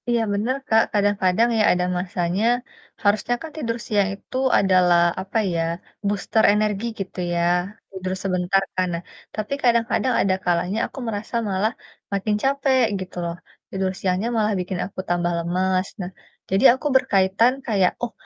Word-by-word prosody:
Iya 235 -1 +2
bener, 220 +6 0
Kak, 220 0 +5
kadang-kadang 205 +1 +2
ya, 215 - +3
ada 180 0 0
masanya 180 +1 -1 0.6
harusnya 215 +4 +2
kan 320 - -7
tidur 230 -6 -2
siang 205 -3 +2
itu 210 - -8 0.2
adalah, 180 -2 +4 0.2
apa 190 +4 -3 0.2
ya, 165 - 0 0.5
booster 205 +2 +1
energi 210 0 0
gitu 190 -1 -6
ya, 170 - 0 0.5
tidur 185 -1 -4
sebentar 185 0 +1
kan, 185 0 +1
nah, 170 +1 -4 0.3
tapi 215 +4 -3
kadang-kadang 235 0 +2
ada 190 -1 +2
kalanya 180 +4 +1
aku - - -10
merasa 215 +1 -4
malah 200 +3 +1 0.4
makin 205 +2 0
capek, 270 -1 +2 0.2
gitu 185 -1 -8
loh, 170 0 -3 0.3
tidur 190 -1 -1
siangnya 185 +3 0
malah 215 -1 +2
bikin 180 0 -3
aku 195 - -10
tambah 175 0 +1
lemes, 185 +2 0
nah, 180 +1 -5 0.4
jadi 195 +4 +1
aku 265 +4 -3
berkaitan 200 0 +3
kayak, 195 -5 +3
"Oh, 240 - -1
195 Hz, 155 wpm, -22 LUFS, 185-220 Hz, 0.6 s, Kak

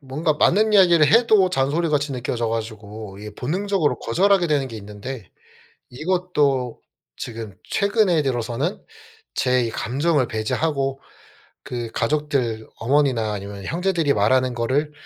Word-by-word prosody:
뭔가 150 +3 -1
맞는 215 +7 +3
이야기를 175 -6 +6
해도 220 -4 +4
잔소리 150 +3 +1
같이 145 -2 0
느껴져 120 -2 -2
가지고 110 -2 -6
이게 105 0 -8
본능적으로 175 - -1
거절하게 190 +7 +2
되는 140 -4 0
게 115 - -8
있는데 105 0 -8 0.6
이것도 145 -5 0 0.4
지금 110 -4 -7
최근에 200 -5 +2
들어서는 130 - -2 0.5
제 125 -1 +2
이 - - -2
감정을 135 +4 0
배제하고 135 +5 -1 0.7
그 120 -2 -5
가족들 125 -5 -1
어머니나 125 -4 +1
아니면 100 -1 -7
형제들이 170 -4 0
말하는 125 +5 +2
거를 135 +6 0
135 Hz, 315 characters per minute, -22 LUFS, 115-165 Hz, 0.7 s, 이야기를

